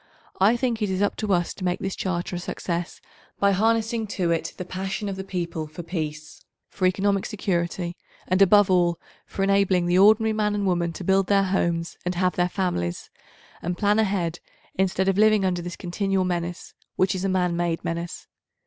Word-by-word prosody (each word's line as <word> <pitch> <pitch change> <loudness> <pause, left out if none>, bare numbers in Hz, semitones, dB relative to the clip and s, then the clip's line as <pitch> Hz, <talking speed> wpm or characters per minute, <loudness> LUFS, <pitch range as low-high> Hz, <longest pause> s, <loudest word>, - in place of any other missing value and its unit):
I 210 +5 +4
think 240 -2 -1
it 210 - 0
is 190 +1 0
up 205 - +1
to 215 -2 -2
us 175 -2 +1
to 190 - -9
make 180 -1 0
this 190 0 -3
Charter 180 -1 -2
a - - -3
success 175 -1 -4 0.4
by 200 0 +4
harnessing 225 +2 +1
to 175 -3 +1
it 165 - -1
the 180 - -5
passion 190 +3 -4
of 200 - -2
872 - - -6
the 190 0 -7
people 170 -4 -3
for 160 +3 -9
peace, 155 -3 -5 0.3
for 185 - +1
economic 195 +1 +1
security, 175 -4 -2 0.3
and 185 +2 +2
above 200 0 +6
all 175 -2 +3 0.3
for 195 - -3
enabling 195 -2 +3
the 175 +1 +3
ordinary 220 +2 +5
man 210 -1 0
and 205 -1 -1
woman 175 -2 +1
to 185 - -7
build 190 +1 +2
their 200 -1 +4
homes 170 -3 -1
and 180 0 -2
have 180 +1 +1
their 175 0 +1
families, 175 - -2 0.5
and 175 +1 -3
plan 210 +1 +2
ahead 185 -5 0 0.3
instead 190 0 0
of 195 +1 +2
living 215 -2 +5
under 180 -2 0
this 175 0 -6
continual 190 +1 -1
menace 175 -1 -3 0.2
which 185 -1 +2
is 185 -1 -3
a 195 - +1
man 180 -2 +1
made 170 -1 -1
menace. 170 0 -4
185 Hz, 200 wpm, -24 LUFS, 175-200 Hz, 0.5 s, above